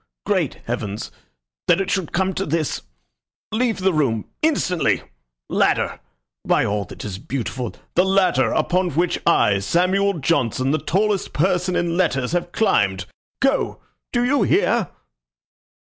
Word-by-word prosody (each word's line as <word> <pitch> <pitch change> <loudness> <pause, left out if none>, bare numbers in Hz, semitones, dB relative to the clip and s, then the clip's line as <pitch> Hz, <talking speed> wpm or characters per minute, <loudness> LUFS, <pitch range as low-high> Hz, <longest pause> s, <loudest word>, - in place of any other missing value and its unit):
Great - - 0
heavens! 105 +1 -4 0.6
That - - +4
it 195 0 -1
should 190 -6 -1
come 190 +2 0
to 195 - -2
this!... 155 0 -1 0.7
Leave 230 0 +1
the 190 0 +1
room 125 -8 +1 0.2
instantly! 230 - +1 0.4
Ladder! - - +1 0.4
By - - +2
all 100 -1 -1
that - - -9
is 95 -2 -5
beautiful 125 0 -4 0.2
the 180 - +4
ladder 190 0 +2
upon 180 0 +1
which 175 +2 +1
I, 105 -12 +4
Samuel 185 - +1
Johnson, 135 -4 +1
the 155 - +1
tallest 200 +5 0
person 180 +2 +1
in 170 0 0
letters, 135 -8 +1
have 175 0 -1
climbed! 100 - +1 0.4
Go! 270 +1 +1 0.3
Do 240 -1 +1
you 275 0 +2
hear?" - - +2
175 Hz, 135 wpm, -21 LUFS, 130-190 Hz, 0.7 s, That